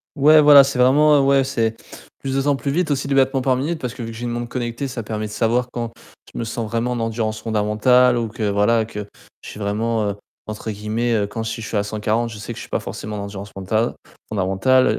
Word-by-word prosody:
Ouais 150 +1 +6
voilà, 145 -1 +9
c'est 135 -1 -2
vraiment, 145 +4 +5
heu, - - +5
ouais 135 0 +4
c'est, 115 -4 -1 0.4
plus 135 -1 -3
de 135 - +2
temps 145 0 +2
plus 140 - -4
vite 160 +2 0
aussi 140 0 -1
de 140 - 0
battement 135 0 +3
par 130 0 +2
minute 155 +6 -2
parce 125 -3 -4
que 120 - -6
vu 115 0 -6
j'ai 120 +2 -6
une - - -2
montre 120 0 -3
connectée, 120 +2 -3
ça 125 -2 -5
permet 110 0 -4
de 105 - -7
savoir 120 +3 0
quand 120 -1 -4 0.4
je - - -10
me - - -2
sens 115 -1 -4
vraiment 115 +2 -1
en 120 - -2
endurance 110 -1 -2
fondamentale 115 +3 +3
ou 115 - -1
que, 110 +1 -6
voilà, 105 +3 +2
que 105 -2 -7 0.3
je - - -10
suis - - -9
vraiment, 105 +1 -1
heu, - - -6 0.3
entre 110 +1 -6
guillemets, 110 +3 -2
heu, 105 -2 +1
quand 110 +3 -5
je 110 - -3
suis 110 0 -5
à - - +2
140, 110 +3 -1
je 110 - -9
sais 110 +3 -6
que - - -13
je - - -6
suis - - -10
pas - - -1
forcément 105 0 -6
en 100 - -4
endurance 100 0 -7
mentale, 110 +5 -1 0.3
fondamentale. 110 +6 +2
115 Hz, 250 wpm, -21 LUFS, 110-130 Hz, 0.4 s, voilà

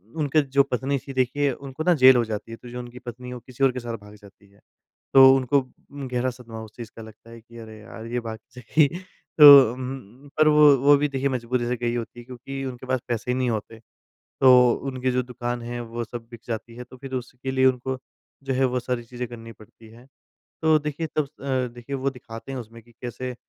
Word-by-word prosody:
उनके 155 -1 +2
जो 140 0 +2
पत्नी 135 +1 -2
थी 135 - -6
देखिए 130 +2 +1
उनको 135 +3 -7
ना 180 - +4
जेल 130 0 +9
हो 120 - +3
जाती 110 +1 -6
है, 115 - -7
तो 120 - -12
जो 125 +1 -7
उनकी 120 0 -9
पत्नी 125 +1 -9
है 125 - -6
वो 125 - -7
किसी 130 +1 -5
और 135 - +5
के 125 - -5
साथ 120 -1 -5
भाग 105 +1 -15
जाती 100 0 -19
है। 100 - -25 0.5
तो 135 0 +9
उनको 135 +1 +2 0.3
गहरा 130 -3 -2
सदमा 115 -3 -9
उस 110 - -12
चीज़ 115 -2 -9
का 115 - -9
लगता 110 +1 -14
है, 115 -1 -12
कि 115 +1 -16
अरे 110 -1 -11
यार! 110 +1 -10
ये 120 +1 -2
भाग 110 -1 -7 0.2
जाएगी। 140 +5 +2 0.5
तो 140 -5 +10
उम्म, 130 0 -8
पर 155 0 +5
वो, 150 -2 +7
वो 145 +3 +5
भी 150 +1 +1
देखिए 135 0 -1
मजबूरी 125 -1 -2
से 125 - 0
गई 120 0 -2
होती 120 +1 -5
है - - -10
क्योंकि 135 +2 -7
उनके 130 0 -7
पास 130 -1 0
पैसे 120 +1 -2
नहीं 130 -1 0
होते। 110 0 -4 0.6
तो 130 - +7 0.4
उनकी 130 -1 -1
जो 125 0 0
दुकान 120 -1 -5
है 120 +1 -5
वो 120 0 -5
सब 115 0 -9
बिक 120 -1 -11
जाती 115 0 -5
है, 125 - -7
तो 130 - -15
फिर 130 +1 -10
उसके 125 +1 -5
लिए 130 0 +3
उनको 130 0 0 0.5
जो 135 - -2
है 135 +1 +2
वो 125 0 0
सारी 120 -1 -3
चीज़ें 125 0 -6
करनी 115 -1 -10
पड़ती 110 +1 -18
है। 120 +3 -17 0.6
तो 160 -1 +5
देखिए 150 +2 -4
तब 155 - +2
अ, 135 -3 -3
देखिए 120 +3 -6
वो 135 +1 -1
दिखाते 125 0 -10
हैं 130 - -4
उसमें 115 0 -10
कि 120 - -22
कैसे 125 +1 -5
125 Hz, 230 wpm, -24 LUFS, 115-135 Hz, 0.6 s, तो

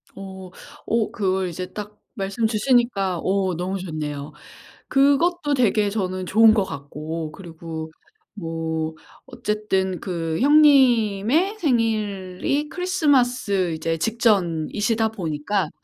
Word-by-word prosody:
어. 190 -1 -9 0.4
어 225 -1 0
그걸 190 -2 -1
이제 180 +2 -5
딱 210 0 -8 0.2
말씀 200 +2 -2
주시니까 220 -5 +1
어 190 0 0
너무 185 +3 -3
좋네요. 150 -4 -5 0.6
그것도 290 +3 +3
되게 215 -5 +2
저는 185 -3 -3
좋은 220 +4 +6
것 210 - +2
같고 155 +2 -6
그리고 160 -3 -8 0.4
뭐 160 -3 -3 0.3
어쨌든 190 -4 -2
그 165 -4 -3
형님의 275 - +4
생일이 225 - -1
크리스마스 255 - +1
이제 165 +1 -2
직전이시다 215 +1 +1
보니까 185 -1 -2
195 Hz, 225 characters per minute, -23 LUFS, 170-235 Hz, 0.6 s, 좋은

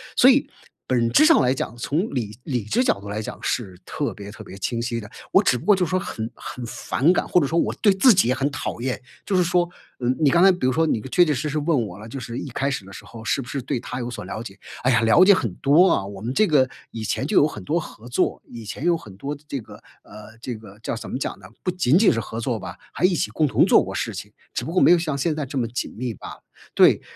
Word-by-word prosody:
所 250 - +6
以， 270 +1 +5 0.4
本 120 -2 +2
质 310 - +6
上 325 0 +6
来 125 - +3
讲， 130 -3 -3
从 155 - -2
理 110 -5 -3
理 125 -6 -2
智 110 - +1
角 100 - +1
度 100 - -8
来 105 - -3
讲 110 - -6
是 100 -7 -2
特 145 - -2
别 100 -2 -9
特 105 - -10
别 95 - -11
清 115 +4 -2
晰 115 0 -2
的， 105 - -10 0.2
我 190 - +6
只 130 -11 +2
不 120 - -10
过 205 - +6
就 185 - 0
是 170 - -1
说 185 - +1
很 110 -9 -5
很 125 - -8
反 140 +6 +1
感， 185 - 0
或 180 - +3
者 145 - +1
说 165 - -1
我 - - +1
对 205 - +6
自 195 +6 +6
己 185 - +3
也 130 - +2
很 135 +1 0
讨 145 - -4
厌。 130 0 -2 0.2
就 200 - -1
是 180 - +4
说， 175 0 +2 0.3
呃， 120 - -3
你 150 -3 +4
刚 170 +4 +4
才 195 - +8
比 180 - -4
如 130 - +2
说 160 +5 +2
你 115 -8 0
确 175 - +5
确 155 - +1
实 150 +3 -2
实 150 - -2
问 145 -7 +1
我 90 - -10
了， 105 +2 -10
就 135 +4 -6
是 120 -1 -6
一 - - -5
开 135 +3 -1
始 140 -8 -4
的 95 - -12
时 - - -10
候 115 -1 -11
是 135 - 0
不 120 - -10
是 135 0 -4
对 125 - -2
他 125 - -6
有 120 0 -4
所 105 -5 -7
了 110 +4 -5
解， 100 -3 -11 0.2
哎 130 - +3
呀， 115 -2 +3
了 130 +11 +6
解 200 - +8
很 120 - -1
多 155 - +4
啊， 95 - +1
我 100 -1 -9
们 115 +3 -3
这 215 - +5
个 140 -7 +3 0.2
以 115 - -6
前 120 - -1
就 - - -2
有 145 - +6
很 105 -10 -8
多 160 - 0
合 120 -7 -10
作， 125 - 0
以 115 -1 -10
前 110 +8 -6
有 175 -1 +4
很 105 - -10
多 140 +7 -4
这 140 - -3
个 110 - -13 0.3
呃， 105 +2 -13
这 125 +1 -5
个 105 -3 -12
叫 - - -2
怎 115 - -7
么 - - -3
讲 130 - -4
呢？ 95 - -13 0.2
不 180 - 0
仅 170 -5 +3
仅 210 +2 +5
是 115 - -1
合 115 0 -5
作 115 -1 -2
吧， - - -8 0.2
还 - - -5
一 180 -1 +4
起 - - -1
共 155 - +1
同 - - +3
做 - - +5
过 - - -6
事 - - -2
情， - - -8 0.2
只 - - -2
不 150 - -5
过 180 - +2
没 - - +6
有 175 - +6
像 155 -4 -2
现 150 +3 0
在 150 -3 -3
这 135 - -5
么 120 -3 0
紧 120 +3 -5
密 120 0 -3
罢 - - -11
了。 - - -24 0.3
对， - - +6
130 Hz, 320 characters per minute, -23 LUFS, 115-165 Hz, 0.4 s, 才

